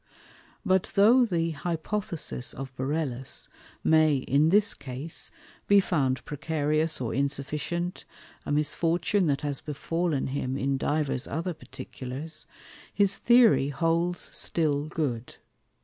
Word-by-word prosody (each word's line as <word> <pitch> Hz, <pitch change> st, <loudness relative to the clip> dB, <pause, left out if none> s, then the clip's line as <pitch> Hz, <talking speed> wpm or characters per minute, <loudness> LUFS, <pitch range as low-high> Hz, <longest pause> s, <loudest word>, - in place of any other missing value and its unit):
But 190 Hz, -1 st, +1 dB
though 235 Hz, +6 st, +6 dB
the 165 Hz, -4 st, 0 dB
Hypothesis 165 Hz, -3 st, -3 dB
of 135 Hz, -1 st, -7 dB
Borellus 135 Hz, -1 st, -2 dB, 0.3 s
may, 155 Hz, -2 st, +4 dB
in 140 Hz, +4 st, +2 dB
this 205 Hz, +3 st, +5 dB
Case, 135 Hz, +5 st, -5 dB, 0.4 s
be 200 Hz, 0 st, +6 dB
found 140 Hz, -9 st, 0 dB
precarious 155 Hz, +1 st, 0 dB
or 120 Hz, -3 st, -3 dB
insufficient 145 Hz, +6 st, -2 dB, 0.4 s
(a -, -, -5 dB
Misfortune 165 Hz, +5 st, +1 dB
that 140 Hz, -2 st, 0 dB
has 145 Hz, -2 st, -3 dB
befallen 155 Hz, 0 st, -2 dB
him 130 Hz, -1 st, -2 dB
in 135 Hz, 0 st, 0 dB
divers 145 Hz, -4 st, -1 dB
other 170 Hz, +4 st, -3 dB
Particulars) 140 Hz, 0 st, -7 dB, 0.4 s
his 200 Hz, -1 st, +2 dB
Theory 235 Hz, -, +5 dB
holds 165 Hz, +5 st, -1 dB
still 150 Hz, -3 st, +1 dB
good. 140 Hz, -7 st, -3 dB
155 Hz, 115 wpm, -27 LUFS, 140-170 Hz, 0.4 s, though